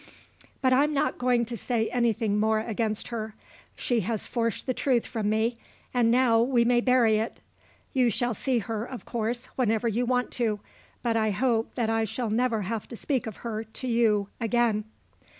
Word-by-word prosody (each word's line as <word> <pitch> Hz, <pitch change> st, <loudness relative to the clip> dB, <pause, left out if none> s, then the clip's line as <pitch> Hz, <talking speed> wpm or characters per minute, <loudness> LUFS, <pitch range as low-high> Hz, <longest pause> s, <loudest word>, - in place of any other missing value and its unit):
But 260 Hz, 0 st, +4 dB
I'm 290 Hz, +3 st, +3 dB
not 290 Hz, +2 st, 0 dB
going 245 Hz, -1 st, +2 dB
to 235 Hz, +1 st, -5 dB
say 225 Hz, +1 st, -1 dB
anything 225 Hz, -3 st, +1 dB
more 220 Hz, 0 st, +2 dB
against 220 Hz, -1 st, -2 dB
her. 220 Hz, -2 st, -4 dB, 0.4 s
She 240 Hz, -2 st, 0 dB
has 220 Hz, +1 st, -2 dB
forced 230 Hz, -2 st, -2 dB
the 255 Hz, -, 0 dB
truth 250 Hz, -2 st, +1 dB
from 215 Hz, -3 st, -2 dB
me, 225 Hz, +2 st, 0 dB, 0.3 s
and 240 Hz, -2 st, +3 dB
now 235 Hz, -2 st, +4 dB
we 240 Hz, -1 st, +3 dB
may 240 Hz, 0 st, +4 dB
bury 240 Hz, -4 st, +4 dB
it. 220 Hz, +2 st, -3 dB, 0.5 s
You 255 Hz, -3 st, +3 dB
shall 240 Hz, +2 st, 0 dB
see 255 Hz, +4 st, 0 dB
her, 225 Hz, -1 st, -2 dB
of 250 Hz, 0 st, -8 dB
course, 235 Hz, +1 st, -2 dB
whenever 225 Hz, -2 st, +1 dB
you 235 Hz, +2 st, 0 dB
want 250 Hz, 0 st, +1 dB
to. 215 Hz, -3 st, +1 dB, 0.4 s
But 230 Hz, -2 st, +1 dB
I 220 Hz, -1 st, +2 dB
hope 225 Hz, +2 st, 0 dB
that 225 Hz, -2 st, 0 dB
I 225 Hz, 0 st, +1 dB
shall 225 Hz, +1 st, -3 dB
never 230 Hz, -1 st, +1 dB
have 215 Hz, +2 st, -3 dB
to 235 Hz, -, -8 dB
speak 260 Hz, -2 st, -1 dB
of 220 Hz, -, -6 dB
her 220 Hz, -1 st, -2 dB
to 225 Hz, +4 st, -7 dB
you 220 Hz, -4 st, +2 dB
again." 230 Hz, -2 st, +1 dB
230 Hz, 185 wpm, -27 LUFS, 220-245 Hz, 0.5 s, But